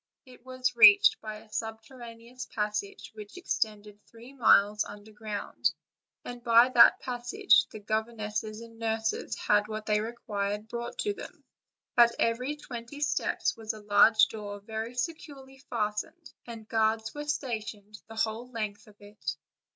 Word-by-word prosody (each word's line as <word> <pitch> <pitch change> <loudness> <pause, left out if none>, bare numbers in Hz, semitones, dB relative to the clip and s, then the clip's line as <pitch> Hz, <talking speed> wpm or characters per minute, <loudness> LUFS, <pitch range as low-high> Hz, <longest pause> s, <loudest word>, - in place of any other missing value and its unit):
It 250 -2 -17
was 255 -1 -2
reached 405 - +7
by 215 -1 -6
a 215 0 -14
sub 225 0 -4
terraneous 240 0 -10
passage 210 -1 -4
which 210 - -11
extended 210 - -3
three 235 +3 -14
miles 210 -5 +4
under 205 +1 -11
ground, 210 -1 -2 0.6
and 245 -1 -8
by 235 +1 +6
that 245 -2 +7
passage 250 - +2
the - - -9
governesses 215 0 -3
and 230 -1 -13
nurses 225 -1 -2
had 210 0 +2
what 215 0 -6
they 210 -1 +1
required 210 -2 -4
brought 235 +1 -6
to 415 - -1
them. 410 - -11 0.5
At 235 -1 +6
every 250 +5 0
twenty 250 -1 -9
steps 295 - 0
was 220 -1 -4
a 215 - -10
large 210 +1 +6
door 205 -2 -7
very 220 +3 -6
securely 270 -2 -6
fastened, 225 +8 -3
and 225 -2 -9
guards 220 0 0
were 295 0 -6
stationed 220 -7 -5
the 225 - -11
whole 225 +3 -2
length 215 -2 -5
of 210 - -17
it. 205 +1 -6
225 Hz, 150 wpm, -29 LUFS, 210-245 Hz, 0.6 s, reached